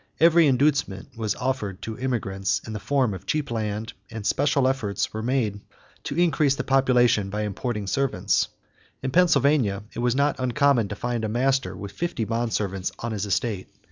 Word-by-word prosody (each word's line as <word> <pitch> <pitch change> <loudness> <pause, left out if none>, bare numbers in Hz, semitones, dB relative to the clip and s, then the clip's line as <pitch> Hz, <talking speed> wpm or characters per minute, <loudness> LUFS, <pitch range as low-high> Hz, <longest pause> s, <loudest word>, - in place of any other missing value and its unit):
Every 165 0 +6
inducement 135 -5 +1
was 110 -3 -1
offered 125 -8 -3
to 110 - -4
immigrants 100 -6 -1
in 110 - -6
the 105 - -4
form 125 +2 +1
of 95 0 -9
cheap 150 -4 -1
land, 110 0 -3 0.2
and 110 -3 -7
special 140 0 +2
efforts 115 -7 -1
were 110 - -3
made 115 -4 0 0.5
to 140 - -4
increase 160 -5 +3
the - - -3
population 125 -6 +3
by 105 +2 -2
importing 105 +1 -3
servants. 135 +7 +1 0.6
In 135 - -1
Pennsylvania, 140 - +3
it - - -6
was 120 0 +1
not 140 -1 +1
uncommon 130 -2 +2
to 105 - -5
find 120 +1 -2
a 110 - -1
master 120 -5 0
with 100 +1 -7
fifty 175 - -2
bond 115 +1 -1
servants 95 -3 -2
on 115 - -4
his 105 -1 -2
estate. 100 0 -1
120 Hz, 175 wpm, -25 LUFS, 105-135 Hz, 0.6 s, Every